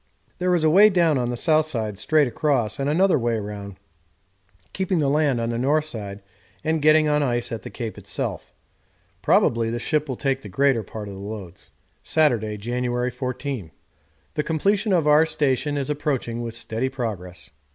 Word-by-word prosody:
There 180 0 +2
is 165 - +1
a 155 - +5
way 205 +5 +7
down 170 -7 +3
on 120 -1 -1
the 120 - -3
south 155 +2 +2
side 110 -8 -3
straight 150 +6 +3
across, 125 -3 0
and 140 +1 0
another 175 +1 +3
way 120 -1 0
round, 100 -2 -6 1.0
keeping 190 -1 -1
the 150 -3 +2
land 145 -4 +2
on 115 0 -1
the 115 - -2
north 150 +4 +2
side 105 -8 -7 0.4
and 160 0 0
getting 155 +1 +5
on 150 0 +2
ice 120 -3 0
at 115 - -4
the - - -8
Cape 115 -3 -6
itself. - - -5 0.7
Probably 115 -1 +3
the 115 - -2
ship 150 +5 -1
will 130 - -2
take 135 +1 -1
the 105 - -9
greater 135 +3 +2
part 105 +1 -8
of 100 - -7
the 95 - -9
loads. 100 -4 -8 0.3
Saturday, 115 -9 +1
January 125 +3 -2
14. 125 - -4 0.6
The 150 - 0
completion 195 +8 0
of 170 -5 +3
our 150 +1 +6
station 145 -2 0
is 140 +1 -2
approaching 135 -5 -2
with 115 -1 -5
steady 115 +2 -2
progress. 105 -9 -6
130 Hz, 185 wpm, -23 LUFS, 115-155 Hz, 1.0 s, way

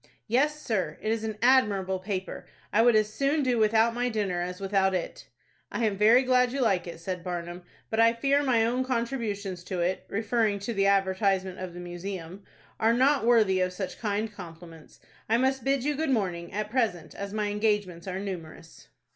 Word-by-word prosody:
"Yes, 290 +6 +1
sir, 190 - -2
it 215 - -2
is 225 -1 -1
an 220 -1 -4
admirable 205 -7 +3
paper. 190 0 -5 0.3
I 220 - +5
would 240 -1 +5
as 215 0 +2
soon 280 +4 +1
do 250 -3 +1
without 220 +1 +3
my 245 +1 -1
dinner 200 -6 -1
as 180 +1 -4
without 195 -1 +1
it." 180 - -5 0.4
"I 235 - -1
am 210 -2 0
very 220 +6 +5
glad 250 -1 +3
you 275 - -3
like 195 -8 +1
it," 170 - -8
said 180 0 -5
Barnum; 175 0 -5 0.3
"but 220 - 0
I 230 0 +6
fear 275 +4 +2
my 240 -5 +2
own 250 +3 0
contributions 230 -7 -3
to 180 -2 -3
it 180 +2 -1
(referring 220 0 0
to 230 +4 -3
the 195 -1 +2
advertisement 190 -1 +1
of 185 -2 -6
the - - -7
Museum) 175 +1 -7 0.4
are 225 +1 +3
not 260 0 +3
worthy 215 -6 +4
of 185 0 0
such 190 0 -5
kind 210 0 -2
compliments. 165 -4 -12 0.3
I 225 - +4
must 265 0 +1
bid 270 -1 +1
you 295 +2 +1
good 310 +1 -2
morning, 180 -8 -1
at 210 +1 -4
present, 215 -10 -1
as 200 0 -6
my 210 0 -1
engagements 205 -4 -1
are 185 0 -3
numerous." 170 -5 -8
210 Hz, 195 wpm, -27 LUFS, 185-235 Hz, 0.4 s, I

